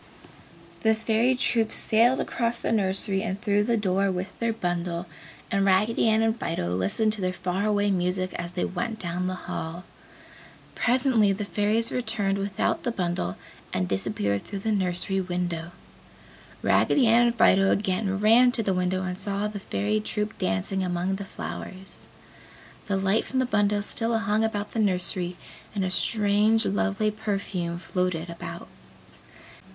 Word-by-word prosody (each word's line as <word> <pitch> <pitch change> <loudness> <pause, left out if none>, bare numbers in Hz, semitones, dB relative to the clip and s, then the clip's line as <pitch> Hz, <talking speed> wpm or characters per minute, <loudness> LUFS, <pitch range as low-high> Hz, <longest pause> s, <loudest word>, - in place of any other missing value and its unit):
The 220 0 +3
Fairy 225 +3 +1
troop 230 -3 +2
sailed 235 +4 +3
across 235 -1 0
the - - -2
nursery 195 -2 0
and 190 +1 -3
through 205 -2 +1
the 235 0 +1
door 195 -1 +1
with 185 +1 -3
their 230 0 0
bundle 175 -4 -3 0.5
and 200 0 +2
Raggedy 205 +4 +3
Ann 220 0 +3
and 225 +1 0
Fido 90 - -2
listened 100 - +2
to 215 - -5
their 185 0 0
far 185 +3 -2
away 205 -1 +2
music 185 0 0
as 175 0 -5
they 180 - -1
went 220 +5 -3
down 180 -1 -3
the 185 - -2
hall. 165 +2 -5 0.9
Presently 245 -4 +2
the 205 +1 -4
Fairies 215 +3 0
returned 220 -5 0
without 195 -1 -1
the 240 - -2
bundle 175 - -2 0.3
and 90 -1 -1
disappeared 100 0 +2
through 200 - -7
the 220 - +1
nursery 190 -1 0
window. 175 -2 -3 0.9
Raggedy 275 - +3
Ann 235 +1 +5
and 235 - 0
Fido 195 -3 +4
again 195 0 0
ran 230 +4 +5
to 225 - +1
the 195 - 0
window 180 +1 0
and 180 0 -4
saw 200 +1 -1
the 210 -1 -6
Fairy 105 - -1
troop 210 - -2
dancing 95 - -1
among 180 +1 -1
the 200 - -6
flowers. 190 0 -8 0.8
The 195 - 0
light 195 +3 +1
from 260 - -5
the 260 - +2
bundle 205 -3 +1
still 225 +2 0
hung 220 -1 0
about 210 -2 -2
the 225 - -3
nursery 180 -3 +1 0.4
and 195 -2 0
a 185 - -2
strange 210 +2 +3
lovely 210 +1 0
perfume 195 -5 -3
floated 180 -2 -2
about. 170 - -8
195 Hz, 160 wpm, -26 LUFS, 180-220 Hz, 0.9 s, Ann